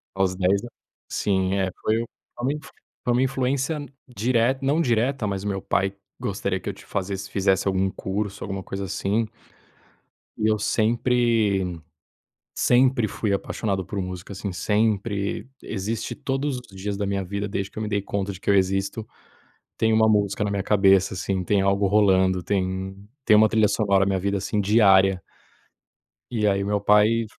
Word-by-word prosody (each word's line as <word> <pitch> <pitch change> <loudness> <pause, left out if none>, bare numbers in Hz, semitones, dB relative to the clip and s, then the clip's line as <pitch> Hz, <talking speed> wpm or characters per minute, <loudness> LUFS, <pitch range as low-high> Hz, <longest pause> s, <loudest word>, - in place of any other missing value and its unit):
Aos 95 -1 +1
10 95 +3 +1
an - - -6 0.4
Sim. 95 -1 0
É, 95 -1 0
foi 110 - +1 0.4
foi 120 - -8
uma 140 - +1
influ 150 - -9 0.3
foi 120 - +1
uma 125 - +2
influência 135 +3 0 0.2
direta 125 +2 +1
não 145 +4 +2
direta, 120 -2 +1
mas 100 -1 -2
o 105 - -3
meu 95 -1 -2
pai 95 0 0 0.2
gostaria 95 -1 -2
que - - -5
eu - - -3
t - - -15
fazesse 95 0 -4
fizesse 95 -1 +1
algum 95 0 +1
curso, 100 +2 -4
alguma 95 -1 -4
coisa 95 0 -5
assim 100 +4 -1 1.1
e 110 - +1
eu 110 - +2
sempre 110 -7 +1 0.8
sempre 125 -2 +3
fui 105 -1 -1
apaixonado 100 -1 -2
por 100 +3 -4
música, 90 +1 -6
assim, 100 0 -4
sempre, 105 +1 0 0.2
existe 110 +2 -3
todos 135 -1 -2
os 125 - -11
dias 100 +1 -4
da 100 - -2
minha 100 -1 -1
vida, 100 +2 -3
desde 100 -1 -3
que - - -27
eu - - -2
me 105 - -2
dei 100 -1 0
conta 100 0 -3
de 95 - -11
que - - -8
eu 100 - +5
existo, 95 +3 0 0.7
tem 110 0 +2
uma 110 0 +4
música 105 -1 +1
na 105 - 0
minha 100 -1 -1
cabeça, 95 -2 +4
assim, 95 0 -2
tem 100 +2 +2
algo 100 +1 +2
rolando, 95 -2 +3
tem 95 0 -2 0.3
tem 105 - +7
uma 110 - +7
trilha 110 -1 +3
sonora 100 -2 +2
na 95 -1 +1
vida, 100 +1 -1
assim, 105 +2 -2
diária. 95 -3 +4 1.1
E 105 -2 +1
aí, 100 0 +2
o - - -3
meu 105 0 +1
pai 105 +3 +4
100 Hz, 175 wpm, -24 LUFS, 95-110 Hz, 1.1 s, tem